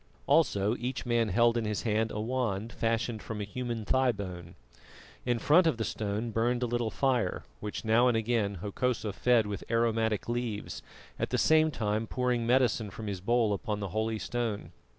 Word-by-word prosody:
Also 100 +3 +3
each 125 +2 -3
man 120 -2 +1
held 115 +4 +3
in 115 - -1
his 105 -1 -2
hand 110 0 +1
a 105 - -4
wand 115 -2 -2
fashioned 115 -1 -1
from 105 +3 -6
a - - -2
human 115 +1 -4
thigh 130 +1 +3
bone. 90 -5 -7 0.7
In 120 -1 +2
front 165 +8 +5
of 155 - +1
the 115 - -1
stone 110 +2 -2
burned 120 +3 +1
a - - +2
little 120 -1 -1
fire, 130 -1 0 0.2
which 105 +2 -5
now 115 +3 +4
and 120 -2 +3
again 110 -3 0
Hokosa 110 0 -1
fed 120 0 +3
with 105 -2 -5
aromatic 115 -2 +1
leaves, 120 -3 -3 0.4
at - - -1
the - - 0
same 155 0 +4
time 110 -5 -1
pouring 125 -2 0
medicine 120 -4 +2
from 110 +3 -8
his 100 -3 -4
bowl 115 +1 +2
upon 105 +1 -3
the 100 -2 -4
holy 110 +3 -1
stone. 115 -2 -3
115 Hz, 185 wpm, -30 LUFS, 105-120 Hz, 0.7 s, front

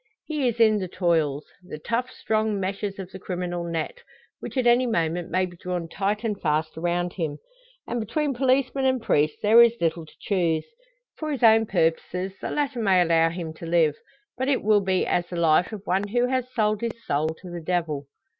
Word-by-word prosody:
He 300 -4 -1
is 235 -1 -2
in 215 -2 +5
the 185 - -3
toils 160 -5 0 0.2
the 180 -4 -8
tough, 235 +10 -2
strong 215 -4 -1
meshes 195 +1 -3
of 190 -2 -7
the 190 - -9
criminal 175 -1 -3
net, 170 - -4 0.4
which - - -7
at 255 - +1
any 240 +1 +4
moment 170 -4 -1
may 185 +2 +1
be 175 -1 -10
drawn 175 -1 -4
tight 200 +5 -2
and 210 -3 -2
fast 155 0 0
around 175 +1 -1
him; 155 -5 -3 0.5
and 240 - -3
between 275 +6 -1
policeman 265 +1 +1
and 260 -1 +2
priest 155 -9 +1
there 220 +3 +7
is 235 0 +5
little 165 -1 -1
to - - -17
choose. 170 -5 0 0.5
For 310 -1 -3
his 270 -4 -3
own 225 -1 +6
purposes 180 +1 0
the - - -3
latter 280 -5 -1
may 195 -4 +4
allow 165 -1 +4
him 165 -2 -5
to 165 +1 -9
live; 165 -3 +3 0.4
but 260 - 0
it 275 -2 +1
will 210 0 +4
be 190 -1 +1
as 175 0 0
the 175 - -7
life 170 +2 +3
of 210 -2 -8
one 195 +2 0
who 240 +4 +1
has 255 0 -1
sold 215 -3 0
his 230 0 -5
soul 150 +2 0
to 180 -2 -10
the 175 -1 -6
devil! 160 -5 -2
190 Hz, 205 wpm, -25 LUFS, 170-230 Hz, 0.5 s, there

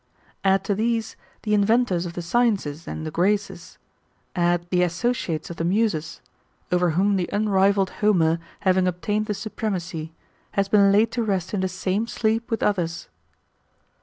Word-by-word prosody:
Add 195 -1 +3
to 200 - 0
these, 225 +2 -1 0.3
the 210 - 0
inventors 205 -4 +2
of 170 - -7
the 175 - -5
sciences 180 -7 0
and 160 - -5
the 155 - -4
graces; 200 +5 -1 0.6
add 175 0 +1
the 180 -1 +3
associates 175 - -1
of 170 - -8
the - - -2
muses; 175 -4 0 0.5
over 180 0 +3
whom 200 +1 +3
the 180 - -2
unrivalled 200 -2 +2
Homer 170 -6 +3 0.2
having 185 -1 +3
obtained 205 +5 -1
the 210 - -1
supremacy, 180 -7 -4 0.4
has 200 -1 +1
been 200 -1 +5
laid 215 +3 +3
to 240 - -1
rest 190 -3 -2
in 205 - 0
the 190 0 0
same 190 +4 -1
sleep 225 0 -1
with 225 - -1
others. 170 -5 -1
195 Hz, 160 wpm, -24 LUFS, 175-210 Hz, 0.6 s, been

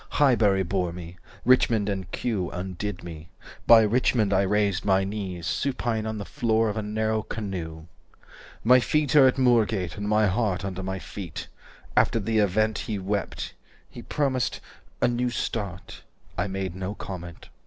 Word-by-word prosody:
Highbury 110 -9 +4
bore 90 -1 -1
me. 85 0 -9 0.3
Richmond 115 -4 +4
and 95 -3 -3
Kew 100 -8 -2
Undid 90 +1 -5
me. 80 -2 -9 0.4
By 115 -1 +9
Richmond 110 -2 +2
I 95 - +4
raised 100 -1 +1
my 95 -1 +3
knees 95 -4 -4
Supine 115 -2 -1
on 110 0 -3
the 100 - -5
floor 115 -4 +1
of 105 - -3
a - - 0
narrow 110 +1 -1
canoe." 85 -8 -5 0.8
295 - - -26
"My 125 +2 +7
feet 150 +3 +1
are 140 -3 +8
at 130 - +1
Moorgate, 110 -8 +2
and 100 0 -3
my 105 0 +4
heart 100 -1 0
Under 95 -1 -4
my 95 0 -3
feet. 90 -1 -7 0.5
After 115 - +3
the 110 +1 0
event 110 +1 +2
He 105 - -3
wept. 100 +1 -3 0.4
He - - -9
promised 135 -4 -1 0.4
'a - - +6
new 120 +1 0
start.' 100 -6 -4 0.3
I - - -1
made 95 -2 -4
no 95 +2 -4
comment. 90 -5 -8
105 Hz, 165 wpm, -26 LUFS, 95-115 Hz, 0.8 s, By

